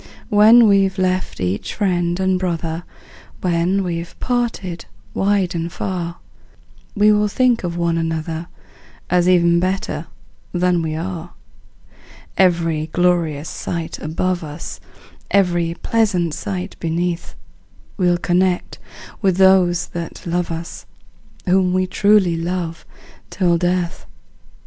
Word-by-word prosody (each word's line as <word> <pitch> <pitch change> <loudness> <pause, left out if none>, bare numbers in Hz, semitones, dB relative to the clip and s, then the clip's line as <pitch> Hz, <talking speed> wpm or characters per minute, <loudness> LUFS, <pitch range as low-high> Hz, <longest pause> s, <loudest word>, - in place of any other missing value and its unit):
When 220 +3 +7
we've 195 -1 +3
left 185 0 -1
each 90 +2 -2
friend 175 -3 0
and 190 -1 +1
brother, 170 -2 -3 0.6
When 180 +2 +1
we're 170 -1 -3
parted 230 -8 -2 0.3
wide 195 -2 +1
and 170 0 -3
far, 175 -2 -4 0.8
We 210 0 +5
will 210 0 +3
think 245 +1 +2
of 175 -1 -3
one 170 -1 +1
another, 165 0 -3 0.6
As 180 0 +3
even 170 -1 +4
better 185 +2 -2 0.5
than 180 -1 +2
we 155 -1 -2
are. 175 0 -5 1.0
Every 165 -4 +2
glorious 165 -3 +1
sight 165 +1 -4
above 175 +3 -2
us, 150 -1 -7 0.5
Every 175 -4 +2
pleasant 195 -8 +1
sight 95 -7 -4
beneath, 170 +1 -2 0.6
We'll 175 -3 +2
connect 180 +1 0 0.4
with 190 -4 +2
those 190 -2 +4
that 170 -1 -7
love 175 0 -1
us, 165 +1 -6 0.6
Whom 185 -1 +3
we 185 0 +2
truly 195 -2 +3
love 170 -1 -4 0.4
till 175 -3 +1
death! 180 0 -1
175 Hz, 115 wpm, -20 LUFS, 170-190 Hz, 1.0 s, When